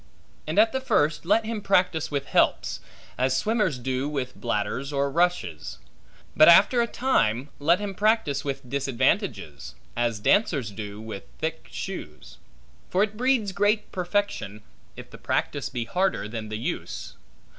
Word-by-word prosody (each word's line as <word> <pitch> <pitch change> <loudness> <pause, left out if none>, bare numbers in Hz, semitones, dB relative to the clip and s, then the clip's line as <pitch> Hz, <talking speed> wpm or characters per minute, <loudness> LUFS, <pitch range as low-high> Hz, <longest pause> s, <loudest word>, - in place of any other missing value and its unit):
And 155 - -3
at 220 +1 +6
the 265 - -2
first 155 - +1
let 220 +3 +3
him 220 -1 -3
practise 180 -5 +2
with 140 -2 -2
helps, - - +1 0.4
as 130 +1 +2
swimmers 210 - +1
do 130 +3 -2
with 135 -4 -4
bladders 120 +4 -2
or 140 0 0
rushes; 170 - -1 0.6
but 155 - +8
after 200 +8 +6
a 235 - +1
time 140 - +1
let 165 +5 +3
him 205 -1 -4
practise 210 -7 +1
with 135 -2 -4
disadvantages, 130 - -1 0.2
as 120 -2 0
dancers 140 - +2
do 105 0 -7
with 110 -3 -7
thick - - -4
shoes. 70 -5 -7 0.5
For 190 +2 +3
it 215 0 -2
breeds 245 -3 +1
great 205 +2 +1
perfection, 180 - -2 0.3
if - - -11
the - - -12
practice - - -1
be 120 -2 -3
harder 185 - 0
than 110 -1 -6
the 110 - -3
use. 115 - -5
145 Hz, 150 wpm, -25 LUFS, -, 0.6 s, but